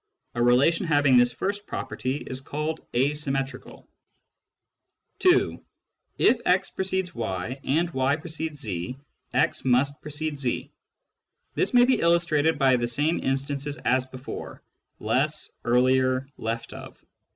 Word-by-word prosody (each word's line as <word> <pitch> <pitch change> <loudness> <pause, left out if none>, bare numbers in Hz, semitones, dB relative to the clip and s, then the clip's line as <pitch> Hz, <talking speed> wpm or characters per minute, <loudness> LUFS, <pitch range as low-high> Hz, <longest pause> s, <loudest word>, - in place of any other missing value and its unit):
A 120 - -2
relation 135 +9 +3
having 145 -4 +4
this 120 0 +5
first 200 - -3
property 130 +1 -3
is 130 0 -4
called 150 +3 -4
asymmetrical. 135 0 -1 1.3
(2) 365 -1 +3 0.5
If 240 - +4
x 185 +2 +2
precedes 190 -1 -2
y 110 +3 -4
and 165 +5 +1
y 130 0 +1
precedes 155 -2 -5
2, 90 +1 -4 0.4
x - - +2
must 135 +3 +2
precede 150 0 -4
2. 130 -3 -2 0.8
This - - 0
may 245 0 +7
be 255 0 +2
illustrated 165 -2 +2
by 135 -2 +4
the 120 0 -1
same 145 +7 0
instances 140 +2 -2
as 130 +1 +1
before: 130 0 -8 0.4
less, 135 +8 0
earlier, 130 +2 +2
left 115 +1 -4
of. - - -11
140 Hz, 125 wpm, -26 LUFS, 130-160 Hz, 1.3 s, may